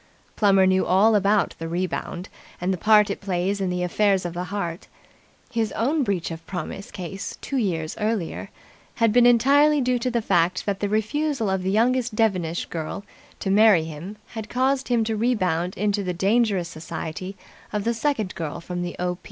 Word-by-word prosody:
Plummer 195 -2 +4
knew 185 0 +3
all 200 +5 +4
about 205 0 +2
the 165 - -4
Rebound 180 +1 -3 0.3
and 180 +2 0
the - - -3
part 210 0 +5
it - - -5
plays 195 +1 -1
in 190 - 0
the 180 0 -1
affairs 195 +1 +1
of 175 - -3
the 175 +1 -4
heart. 175 -2 -4 0.6
His 225 -3 -1
own 285 +7 +1
breach 195 -9 -1
of 165 0 -7
promise 185 +2 -6
case 190 +1 -6
two 275 - -3
years 165 -9 -1
earlier 210 -5 -2 0.5
had 230 -2 +2
been 245 0 +6
entirely 285 +5 +5
due 250 -1 +1
to 250 - -1
the 240 -1 0
fact 180 -2 +1
that 200 -2 -1
the 205 - -1
refusal 220 +2 0
of 190 -1 0
the 185 - -1
youngest 240 +2 +1
Devenish 185 -7 0
girl 165 +4 -5 0.4
to 195 - -1
marry 205 -4 +6
him 165 +6 -8
had 220 -2 -7
caused 265 +2 +1
him 240 -2 +2
to 220 0 -1
rebound 185 -7 0
into 205 +1 0
the 180 -1 -2
dangerous 195 -1 +2
society 165 +3 -6 0.3
of 210 -1 -2
the 235 - +1
second 230 -5 -1
girl 160 -4 -5
from 175 +1 -5
the 175 0 -4
O. 180 0 -2
200 Hz, 185 wpm, -24 LUFS, 180-225 Hz, 0.6 s, been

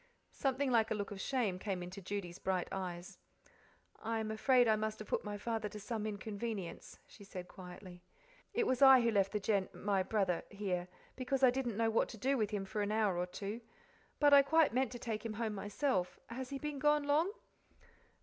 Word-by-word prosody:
Something 270 0 0
like 225 -2 +3
a - - 0
look 205 -1 -4
of 195 -1 -6
shame 220 -9 0
came 190 -3 -3
into 185 +3 -8
Judy's 185 -2 -5
bright 185 -2 -1
eyes, 180 -2 -5 0.8
"I 225 +1 -2
am 220 -1 -2
afraid 245 +2 +4
I 220 - +5
must 215 0 -2
have 215 - -8
put - - -1
my 205 -1 -4
father 220 0 -2
to 210 - -8
some 215 +1 -3
inconvenience," 205 -2 -5
she 205 - -15
said 185 -2 -8
quietly. 180 0 -11 0.5
"It 465 - +1
was 260 -6 0
I 265 -2 +9
who 235 -1 +2
left 195 -2 +2
the 210 - -1
Gen 200 -2 +1
my 200 -1 0
brother 190 -3 0
here, 190 -4 -2 0.3
because 265 +1 -1
I 255 - +8
didn't 245 -4 -2
know 225 0 +2
what 225 - +2
to 225 - -8
do 265 +6 +1
with 215 -5 0
him 205 -2 -3
for 210 +2 -3
an 205 0 -1
hour 215 -4 +2
or 175 +1 -1
two. 205 +5 -5 0.6
But 290 -1 +6
I 280 - +10
quite 315 -1 +3
meant 255 -1 +1
to - - -5
take 225 -3 -4
him 225 -2 -4
home 220 0 -2
myself. 205 -1 -1
Has 255 +2 -5
he 280 - -3
been 295 0 -4
gone 295 +1 +3
long?" 300 +6 +2
215 Hz, 210 wpm, -35 LUFS, 195-250 Hz, 0.8 s, I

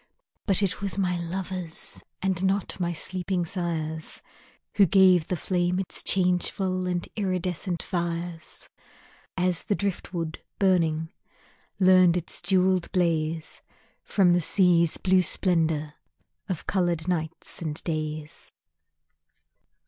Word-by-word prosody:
But 200 0 +3
it 190 0 -1
was 200 -1 0
my 180 -3 0
lovers, 180 -1 -4 0.2
And 190 -1 0
not 195 0 0
my 175 -1 0
sleeping 180 +1 -2
sires, 160 -3 -4 0.5
Who 200 -2 +6
gave 185 -2 +5
the 180 - -1
flame 180 +1 0
its 190 -1 -2
changeful 185 0 +1
And 175 -1 -2
iridescent 185 -3 -2
fires; 170 -1 -4 0.7
As 180 -1 +1
the 205 - 0
driftwood 175 -5 -3 0.2
burning 165 -4 +1 0.7
Learned 185 -2 +6
its 175 - -3
jewelled 185 0 +2
blaze 165 -3 -1 0.4
From 185 -4 +3
the 175 - +3
sea's 170 -2 +3
blue 190 0 +3
splendor 160 -4 +1 0.6
Of 180 -5 -3
colored 175 -3 0
nights 165 -2 -3
and 155 -3 -3
days. 155 -2 -5
180 Hz, 110 wpm, -26 LUFS, 165-185 Hz, 0.7 s, Who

